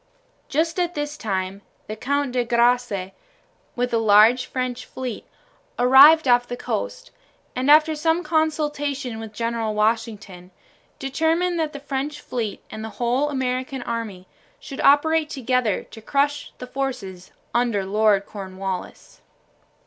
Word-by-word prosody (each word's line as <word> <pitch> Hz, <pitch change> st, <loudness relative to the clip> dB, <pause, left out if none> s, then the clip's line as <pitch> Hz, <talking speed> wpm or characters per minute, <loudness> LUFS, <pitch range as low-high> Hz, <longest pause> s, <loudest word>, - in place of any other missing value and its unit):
Just 325 Hz, +4 st, 0 dB
at 350 Hz, 0 st, -1 dB
this 295 Hz, 0 st, -3 dB
time 195 Hz, -5 st, -3 dB, 0.2 s
the 215 Hz, -, -6 dB
Count 280 Hz, +4 st, -1 dB
de 245 Hz, -1 st, 0 dB
Grasse, 235 Hz, -5 st, +1 dB, 0.6 s
with 245 Hz, 0 st, -1 dB
a 230 Hz, -, +3 dB
large 220 Hz, +3 st, +5 dB
French 255 Hz, -1 st, -3 dB
fleet, 255 Hz, -4 st, -6 dB, 0.5 s
arrived 275 Hz, +5 st, +7 dB
off 245 Hz, 0 st, +4 dB
the 245 Hz, -, -5 dB
coast, -, -, -4 dB, 0.4 s
and, 255 Hz, +2 st, 0 dB
after 310 Hz, +1 st, +6 dB
some 325 Hz, +3 st, +1 dB
consultation 295 Hz, -6 st, -1 dB
with 220 Hz, -1 st, -7 dB
General 230 Hz, 0 st, -2 dB
Washington, 210 Hz, -4 st, -2 dB, 0.5 s
determined 325 Hz, +6 st, 0 dB
that 315 Hz, -2 st, -1 dB
the 285 Hz, -, -8 dB
French 285 Hz, +1 st, -4 dB
fleet 230 Hz, -7 st, -4 dB
and 215 Hz, -, -6 dB
the 220 Hz, -, -5 dB
whole 250 Hz, +5 st, +1 dB
American 260 Hz, -1 st, -2 dB
army 215 Hz, -6 st, -5 dB, 0.3 s
should 275 Hz, -2 st, -7 dB
operate 310 Hz, +2 st, +4 dB
together 250 Hz, -6 st, 0 dB
to 220 Hz, -, -11 dB
crush 285 Hz, +5 st, 0 dB
the -, -, -7 dB
forces 250 Hz, -9 st, -5 dB, 0.2 s
under 235 Hz, -5 st, +1 dB
Lord 205 Hz, 0 st, +2 dB
Cornwallis. 190 Hz, -2 st, -7 dB
250 Hz, 135 wpm, -23 LUFS, 220-290 Hz, 0.6 s, arrived